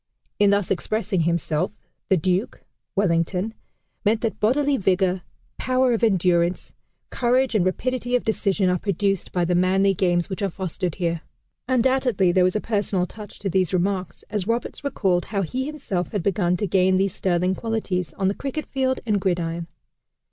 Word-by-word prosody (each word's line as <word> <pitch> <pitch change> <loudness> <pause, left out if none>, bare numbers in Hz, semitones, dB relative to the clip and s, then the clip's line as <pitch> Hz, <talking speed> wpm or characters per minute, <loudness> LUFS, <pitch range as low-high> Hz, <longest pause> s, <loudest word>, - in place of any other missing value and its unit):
In 205 -1 +5
thus 200 -2 +1
expressing 210 +1 0
himself, 170 0 0 0.4
the 190 - +4
Duke 185 +5 -1 0.3
(Wellington) 185 +2 +1 0.5
meant 220 +2 +2
that 225 -2 -2
bodily 280 +6 +2
vigor, 185 -3 +1 0.4
power 255 -1 +2
of 230 - -1
endurance, 180 -4 +2 0.4
courage, 255 +1 +2
and 210 -5 +3
rapidity 245 +6 -1
of 250 - +1
decision 200 -3 +1
are 180 0 +2
produced 195 0 -1
by 175 -1 +1
the 180 - +1
manly 190 +2 +3
games 175 -2 +1
which 190 +1 -5
are 200 - +1
fostered 180 -1 -3
here." 170 -3 -1 0.5
Undoubtedly 255 -6 +2
there 185 +1 +4
was 185 +2 +2
a - - +2
personal 205 -4 0
touch 210 +3 -11
to 200 - -4
these 185 -1 +1
remarks, 185 0 -1
as 210 -3 -1
Roberts 235 +5 -2
recalled 190 -11 0
how 200 -2 -1
he 260 - -3
himself 195 - -3
had 200 -5 -1
begun 180 -2 +1
to 210 - -1
gain 185 0 +3
these 195 -1 +1
sterling 180 0 +1
qualities 195 -6 -2
on 190 - -1
the 195 - +2
cricket 275 +6 -4
field 260 -1 -1
and 210 -3 +1
gridiron. 170 -2 -1
195 Hz, 170 wpm, -23 LUFS, 180-225 Hz, 0.5 s, In